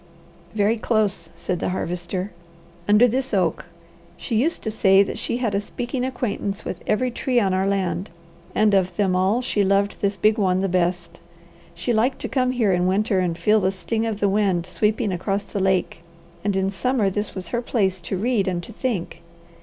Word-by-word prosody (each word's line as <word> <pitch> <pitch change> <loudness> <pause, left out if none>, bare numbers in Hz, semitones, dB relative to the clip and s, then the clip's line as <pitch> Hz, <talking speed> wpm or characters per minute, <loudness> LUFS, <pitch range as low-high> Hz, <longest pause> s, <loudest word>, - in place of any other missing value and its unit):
"Very 215 +2 +2
close," 210 -7 0
said 180 -2 -3
the - - -1
Harvester. 180 +2 -3 0.6
"Under 210 +4 +6
this 255 -1 -1
oak. 185 -2 0 0.5
She 230 - -3
used 290 +10 +1
to 220 - -2
say 195 -2 +5
that 200 - -5
she 235 - -2
had 235 -5 -1
a 200 - +1
speaking 245 +4 -4
acquaintance 230 -5 -3
with 180 - -5
every 250 +4 +1
tree 250 +1 +1
on 195 -4 +1
our 190 +1 +1
land, 190 -2 -1 0.5
and 215 -1 +3
of 190 -2 +2
them 195 -3 +2
all 195 +7 +2
she 210 -4 +1
loved 200 +1 +1
this 200 0 0
big 215 +2 +3
one 185 -2 +2
the 195 - +1
best. 175 -1 -1 0.6
She 180 +8 -1
liked 240 +4 +2
to - - -2
come 255 -2 +1
here 235 -6 +2
in 180 0 +1
winter, 200 +1 +1
and 175 -2 -1
feel 215 +3 +3
the 190 -1 +1
sting 220 +4 -2
of 215 -2 -3
the 205 - +2
wind 195 -4 +1
sweeping 210 +3 0
across 195 +3 -1
the 200 - -5
lake, 190 -3 0 0.4
and 200 -1 0
in 190 0 +1
summer 220 -1 0
this 205 +2 -3
was 185 -3 -5
her 240 - -1
place 195 -6 0
to 175 +2 -4
read 215 -1 +1
and 175 -2 -1
to 230 - -10
think. 225 -7 -3
200 Hz, 200 wpm, -23 LUFS, 185-225 Hz, 0.6 s, Under